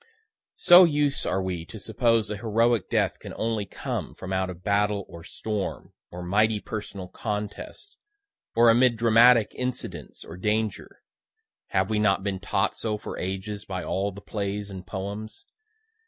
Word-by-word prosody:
So 175 +1 +8
used 145 -4 +1
are 95 +1 0
we 90 -3 -3
to 110 - -9
suppose 110 0 +1
a 105 - -3
heroic 115 +1 +1
death - - +1
can - - -9
only 110 -3 -1
come - - -5
from 95 0 -6
out 95 0 0
of 90 -1 -9
battle 100 -1 +1
or 85 -1 -11
storm, 105 +2 -4 0.2
or 90 +1 -7
mighty 105 +4 +2
personal 100 -3 -6
contest, 105 - -5 0.6
or 115 0 +7
amid 120 0 +4
dramatic 115 0 +5
incidents 125 0 -5
or 85 - -9
danger, 105 +1 -2 0.6
(have 95 +2 0
we 105 - +1
not 95 -2 +2
been 95 -2 -2
taught - - 0
so 110 -2 -1
for - - -7
ages 95 +2 -4
by 90 -2 -4
all 95 +3 -1
the 100 +1 -11
plays 100 -1 -4
and 95 -2 -8
poems?) 100 +4 -6
105 Hz, 155 wpm, -26 LUFS, 95-115 Hz, 0.6 s, So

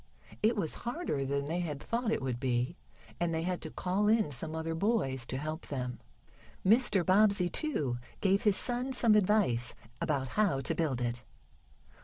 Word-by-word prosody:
It 225 +2 +3
was 165 -6 0
harder 240 - -2
than 140 +1 -1
they 165 +4 -2
had 155 -5 -3
thought 230 - -1
it - - -1
would 125 -2 -2
be, 125 +3 0 0.4
and 175 -1 0
they 160 0 -1
had 180 0 -2
to - - -6
call 190 +3 0
in 215 -7 +3
some 155 +5 -4
other 160 0 -2
boys 160 - 0
to 130 - -3
help 155 +3 -5
them. 125 -3 -4 0.7
Mr. 205 -3 +4
Bobbsey, 200 -1 +4
too, 145 - 0 0.2
gave 195 0 +2
his 210 -4 +3
son 250 +2 0
some 230 -4 +4
advice 195 - +2 0.3
about 135 -4 0
how 200 -8 +1
to 135 - -1
build 145 -7 -1
it. 120 0 -2
170 Hz, 175 wpm, -31 LUFS, 135-210 Hz, 0.7 s, Mr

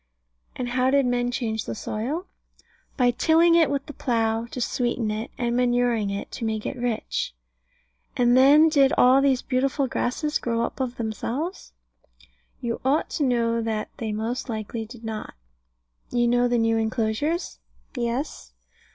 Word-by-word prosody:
And 245 -1 -3
how 255 +1 +2
did 275 0 +3
men 245 0 +1
change 225 -4 -2
the - - -4
soil? 260 - -3 0.7
By 250 -3 +4
tilling 330 +7 +4
it 335 -2 +5
with 280 -1 -2
the 295 - -9
plough, 225 -3 0
to 250 - -7
sweeten 240 -2 -1
it, 215 +2 -4
and 240 -1 -1
manuring 245 -3 +2
it, 200 0 -5
to - - -6
make 220 -1 -2
it - - -3
rich. 240 - -2 0.8
And 245 0 +4
then 285 +5 +7
did 280 -4 +4
all 255 +2 +6
these 270 -2 +2
beautiful 270 +2 0
grasses 270 +3 -1
grow 230 -1 -1
up - - -4
of 255 -2 -2
themselves? 240 - -4 0.9
You 235 -1 -3
ought 275 +4 +1
to 300 - -1
know 230 -3 +1
that 220 -1 -3
they 220 -2 -3
most 230 +5 -3
likely 220 0 -4
did 235 0 -12
not. 220 - -6 0.7
You 240 -1 +1
know 245 +1 +3
the 245 0 +1
new 225 0 +2
enclosures? 225 +9 -1 0.4
Yes. 245 +4 -3
245 Hz, 160 wpm, -25 LUFS, 225-265 Hz, 0.9 s, then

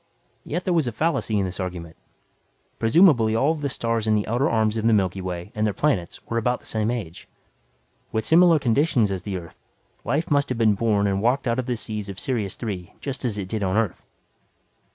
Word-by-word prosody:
Yet 175 +5 -3
there 180 - +1
was 160 -6 +2
a - - -1
fallacy 125 -4 0
in 100 - +1
the 90 - -6
argument. 85 -3 -6 0.8
Presumably 115 - +4
all 135 +7 +3
of 160 -2 -4
the 140 - -1
stars 115 -3 -1
in 110 - +3
the 105 - 0
outer 120 +5 +1
arms 110 -1 +1
of 110 0 0
the 115 - +4
Milky 95 -2 +1
Way 90 +1 -5
and 105 - -2
their 105 -2 0
planets 130 -13 -1
were 115 - -1
about 125 +2 0
the - - -19
same 110 0 -1
age. 100 -9 -5 0.8
With 110 - -1
similar 170 0 +6
conditions 125 -4 +2
as 95 -2 -3
the 95 0 -4
Earth, 85 -2 -11 0.4
life 155 +3 -1
must 140 -1 +2
have 125 - -2
been 110 -2 +4
born 105 -1 +1
and 100 -1 0
walked 125 +4 +1
out 120 +2 +1
of 130 - -3
the 125 - 0
seas 105 -2 -4
of 100 - -7
Sirius 110 -8 -2
Three 95 -7 -6
just 135 -1 -5
as 115 -5 -1
it 95 -2 -4
did 110 +2 -3
on 95 +1 0
Earth. 110 -5 0
110 Hz, 220 wpm, -24 LUFS, 100-130 Hz, 0.8 s, similar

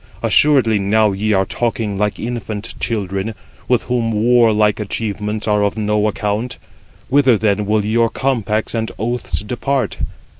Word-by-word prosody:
assuredly 130 -8 +4
now 105 +2 +2
ye 105 +3 -1
are 95 -2 +2
talking 115 -1 -2
like 105 +1 -1
infant 115 -2 -4
children, 100 -1 -2 0.3
with 125 -2 +2
whom 120 -2 -1
warlike 110 -2 +3
achievements 105 0 -3
are 105 -1 +2
of 100 +2 -1
no 105 0 +1
account. 105 +3 -2 0.5
Whither 130 -3 +4
then 105 -1 0
will 105 -1 +1
your 115 +2 +2
compacts 110 -5 -1
and 115 -1 -2
oaths 120 +3 -2
depart? 125 +2 -2
110 Hz, 140 wpm, -18 LUFS, 105-120 Hz, 0.5 s, assuredly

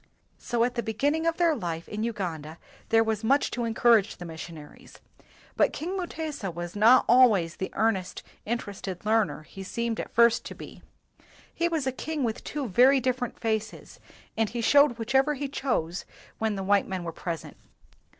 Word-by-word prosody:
So 235 -2 0
at 245 +1 0
the 235 - -1
beginning 285 +9 0
of 330 - +1
their 335 -3 +3
life 170 - -4
in 210 +1 -4
Ugan 190 -9 -3
da 155 +2 -10 0.3
there 225 0 +5
was 220 -1 -2
much 275 +5 +2
to 240 -1 -2
encourage 230 -2 +3
the 175 - -8
mis 160 -1 -8
sionaries. 155 -3 -11 0.6
But - - +2
King 355 +5 -4
Mutesa 315 - -4
was 175 +2 -6
not 225 +5 +6
always 220 -9 +4
the 190 - -3
earnest, 205 -5 -1 0.2
interested 205 -5 -5
learner 215 -6 +1
he 195 - -11
seemed 230 +3 -3
at - - -4
first 235 0 +4
to - - -7
be. - - -11 0.7
He 340 - 0
was 320 -5 -1
a 260 - +1
king 305 +2 -4
with 225 -2 -2
two 285 -3 -4
very 255 +7 +5
different 250 -1 -2
faces, 220 -1 -3 0.4
and 220 -1 +1
he 240 - -5
showed 285 0 +5
whichever 265 +6 +2
he 280 +1 -3
chose 220 - -2 0.4
when 220 -1 0
the 195 - -4
white 200 +1 +2
men 190 -2 -4
were 165 - -4
present. 165 -1 -6
225 Hz, 180 wpm, -27 LUFS, 195-260 Hz, 0.7 s, not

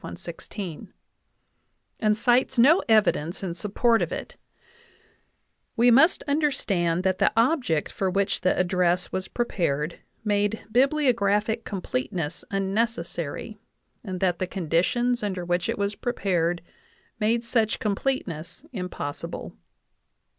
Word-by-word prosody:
116) 180 -7 -7 1.1
and 215 -1 +2
cites 245 +3 +2
no 290 +10 +6
evidence 200 -6 +2
in 180 -3 -2
support 210 +6 +1
of - - -1
it, - - -6 1.4
we 240 +1 +6
must 275 +9 +5
understand 195 - +1
that 185 -1 +1
the - - +4
object 230 - +2
for 190 - -1
which 195 +1 0
the 185 - +2
address 180 0 +1
was 190 0 -3
prepared 170 - -1 0.2
made 205 0 0
biblio 275 +1 +3
graphic 210 +2 +1
completeness 170 -3 -3
unnecessary, 195 -2 -2 0.4
and 185 -4 -5
that 180 -2 +1
the 185 - -1
conditions 195 +9 0
under 190 -4 -3
which 175 0 0
it - - -1
was 200 +1 -1
prepared 175 -7 -1 0.6
made 230 +2 +1
such 225 -2 +1
completeness 205 - -3
impos 180 -8 -4
sible. - - -7
200 Hz, 120 wpm, -25 LUFS, 175-235 Hz, 1.4 s, no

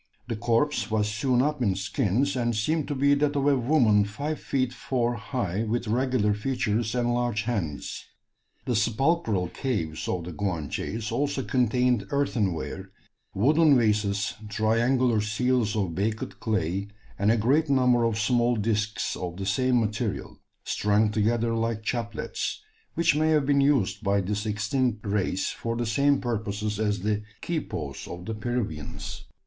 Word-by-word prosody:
The 115 - -2
corpse 120 +6 +1
was 105 -1 +1
sewn 125 +4 +1
up 150 -1 -1
in 100 -6 +2
skins, 110 +7 0
and 120 -2 0
seemed 150 +8 0
to 145 - -2
be 140 +2 +4
that 145 +1 +1
of 140 -1 +1
a 145 -1 +5
woman 120 -5 +4
five 140 +10 -4
feet 130 -2 -1
four 120 -1 -1
high, 110 -4 -2
with 115 +1 -2
regular 120 -2 +1
features 110 0 -1
and 120 -1 +1
large 120 -3 0
hands. 100 -11 -3 0.6
The 125 - 0
sepulchral 115 - +1
caves 85 - -3
of 90 -2 -1
the 90 - -6
Guanches 100 +4 -3
also 140 +2 -1
contained 125 -3 +1
earthenware, 110 - -1 0.5
wooden 145 +7 +5
vases, 105 -3 +1 0.2
triangular 115 +2 +2
seals 110 +1 +1
of 95 -6 -1
baked 105 +5 -2
clay, 100 -2 -1 0.3
and 100 +2 +3
a 115 - +3
great 140 +8 +2
number 125 -3 +4
of 115 -2 +1
small 120 +2 +2
discs 110 0 -1
of 90 -1 -5
the 100 - -4
same 125 +5 +2
material, 110 0 -3 0.2
strung 105 +1 +2
together 115 +2 +1
like 115 -1 -1
chaplets, 115 - -3 0.3
which 170 -3 +3
may 155 +1 +2
have 150 -3 +3
been 140 0 +3
used 135 -8 +2
by 100 0 +2
this 105 +3 -2
extinct 105 +2 -1
race 100 -2 0
for 115 0 -4
the 120 0 -1
same 140 +5 +3
purposes 105 -3 -2
as 105 -3 0
the 105 +1 0 0.2
"quipos" 110 - -4
of 85 +1 -8
the 115 - -3
Peruvians. 105 - -4
115 Hz, 155 wpm, -26 LUFS, 105-130 Hz, 0.6 s, a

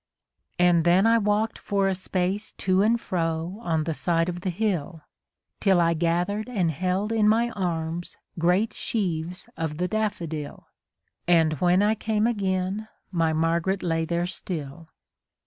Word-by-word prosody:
And 175 -2 +4
then 175 +4 +4
I 230 0 +5
walk'd 210 +1 0
for 200 -1 0
a 195 - +1
space 190 +2 -2
to 185 0 +1
and 230 +3 +3
fro 165 0 -2
on 160 -8 0
the 160 +1 -2
side 165 +2 0
of 175 0 -5
the 185 - -2
hill, 175 -5 -2 0.6
Till 190 -3 +3
I 170 -1 +3
gathered 175 +7 0
and 185 -9 +1
held 185 +6 -1
in 215 -2 +3
my 235 +2 +2
arms 170 -4 -3 0.2
great 180 +6 +2
sheaves 180 -4 -3
of 160 -2 -3
the 180 +2 0
daflFodil, 180 -8 -3 0.6
And 165 -3 +4
when 180 +2 +4
I 210 +1 +3
came 215 0 0
again 195 -2 -1 0.2
my 165 -3 +1
Margaret 165 +4 0
lay 165 -1 0
there 170 +1 -1
still. 165 -3 -6
180 Hz, 150 wpm, -25 LUFS, 165-205 Hz, 0.6 s, I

